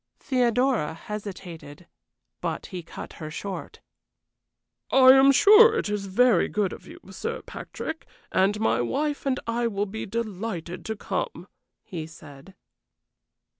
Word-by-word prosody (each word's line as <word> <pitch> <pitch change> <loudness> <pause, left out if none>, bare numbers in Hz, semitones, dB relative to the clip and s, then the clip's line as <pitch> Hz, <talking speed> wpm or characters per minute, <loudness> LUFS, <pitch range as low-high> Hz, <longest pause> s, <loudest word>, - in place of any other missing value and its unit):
Theodora 245 - +1
hesitated 180 -5 -8 0.6
but - - -3
he 185 -3 -6
cut 165 - -9
her 155 - -5
short. 195 +5 -7 1.1
"I 260 -1 +8
am 270 +1 +7
sure 435 - +7
it - - -1
is 205 -1 -2
very 220 0 +4
good 205 -3 -1
of - - -12
you, - - -11
Sir 460 - -5
Patrick, 320 0 -7 0.2
and 200 +2 +2
my 220 - +2
wife 290 - -2
and 260 -1 +1
I 235 +1 0
will 205 -2 -1
be 215 +2 -6
delighted 195 -5 -4
to 220 - -3
come," - - -4 0.4
he 165 -6 -6
said. 155 +2 -14
210 Hz, 130 wpm, -26 LUFS, 180-255 Hz, 1.1 s, I